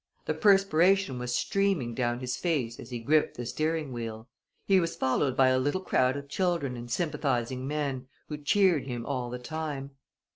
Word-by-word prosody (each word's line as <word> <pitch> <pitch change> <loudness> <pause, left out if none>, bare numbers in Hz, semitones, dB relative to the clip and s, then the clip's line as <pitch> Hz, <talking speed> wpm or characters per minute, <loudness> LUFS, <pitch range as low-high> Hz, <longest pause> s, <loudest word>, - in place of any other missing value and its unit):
The - - 0
perspiration 195 - +3
was 125 0 -2
streaming 195 -12 0
down 120 0 -1
his 125 -1 -2
face 135 -10 -1
as - - -9
he 125 - -4
gripped 150 +6 +1
the 120 - -4
steering 155 +1 -2
wheel. 115 -1 -6 0.4
He 195 -1 +5
was 165 -2 -1
followed 130 0 0
by 130 -1 +6
a 130 0 +3
little 145 +7 0
crowd 130 -6 +2
of 140 0 -7
children 170 -5 -1
and 120 0 -8
sympathizing 130 -4 -1
men, 140 -3 -2 0.2
who 150 - -5
cheered 170 -1 +3
him 120 -2 -4
all 125 -3 -2
the 125 - -4
time. 140 +1 -5
135 Hz, 180 wpm, -28 LUFS, 125-160 Hz, 0.4 s, by